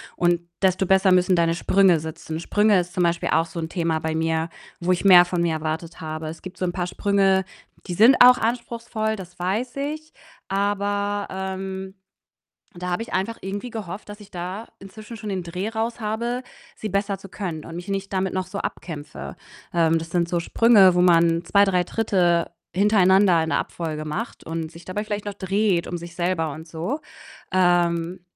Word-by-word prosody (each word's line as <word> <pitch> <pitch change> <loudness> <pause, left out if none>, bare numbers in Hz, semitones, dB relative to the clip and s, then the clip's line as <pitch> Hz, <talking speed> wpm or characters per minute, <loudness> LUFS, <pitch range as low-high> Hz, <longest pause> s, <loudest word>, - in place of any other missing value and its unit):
Und 175 -1 +2 0.2
desto 190 0 +2
besser 190 +1 +4
müssen 180 0 +4
deine 165 -1 +2
Sprünge 185 -1 +4
sitzen. 160 0 -6
Sprünge 205 +3 +3
ist 180 0 -4
zum 180 -2 +1
Beispiel 170 0 0
auch 160 +2 +3
so 165 +1 -7
'n 160 -1 -4
Thema 165 -2 -1
bei 160 0 -2
mir, 160 0 0 0.3
wo 175 +1 0
ich 175 - -2
mehr 180 -2 +9
von 175 -1 -1
mir 170 -1 +1
erwartet 160 +2 -4
habe. 155 0 -5
Es 160 +1 -7
gibt 185 -1 -9
so 185 - -1
'n 175 - -1
paar 175 -1 -2
Sprünge 195 0 +2 0.4
die 175 - -3
sind 230 +8 +7
auch 250 0 +8
anspruchsvoll, 230 -1 -2
das 185 -2 -10
weiß 205 +8 -2
ich. 305 +3 -5 0.3
Aber, 205 +1 -1
ähm, 190 0 -5 0.8
da 180 +1 -5
habe 175 +5 -1
ich 230 - -7
einfach 195 +5 -1
irgendwie 200 +5 -5
gehofft, 210 -2 -7
dass 205 +1 -9
ich 210 - -14
da 185 +5 -5
inzwischen 215 +4 -10
schon 215 0 -6
den 190 -2 -2
Dreh 180 +5 -4
raus 225 +2 -3
habe, 235 +3 -2 0.3
sie 215 - -5
besser 200 0 -1
zu 195 +1 -13
können 175 -5 -5
und 165 - -8
mich 175 +2 -7
nicht 195 0 -3
damit 190 -1 0
noch 185 0 -1
so 200 +2 -5
abkämpfe. 150 -6 -6 0.4
Ähm, 165 -1 +3
das 165 0 -6
sind 170 -1 +1
so 175 - 0
Sprünge, 200 0 +5
wo 180 - +3
man 170 -1 +4
2, 200 +4 +4
3 180 -2 +2
Tritte 175 -5 +1 0.2
hintereinander 190 -3 +4
in 160 - -3
der - - +1
Abfolge 155 -2 -4
macht 205 +10 -5
und 165 -1 -4
sich 170 0 -14
dabei 205 +3 -3
vielleicht 210 -1 -4
noch 205 - -4
dreht 195 -2 0
um 175 - -3
sich 170 0 -9
selber 175 -3 0
und 160 +3 -10
so. 170 - -3 0.5
Ähm, 175 -1 +2
185 Hz, 195 wpm, -23 LUFS, 170-205 Hz, 0.8 s, mehr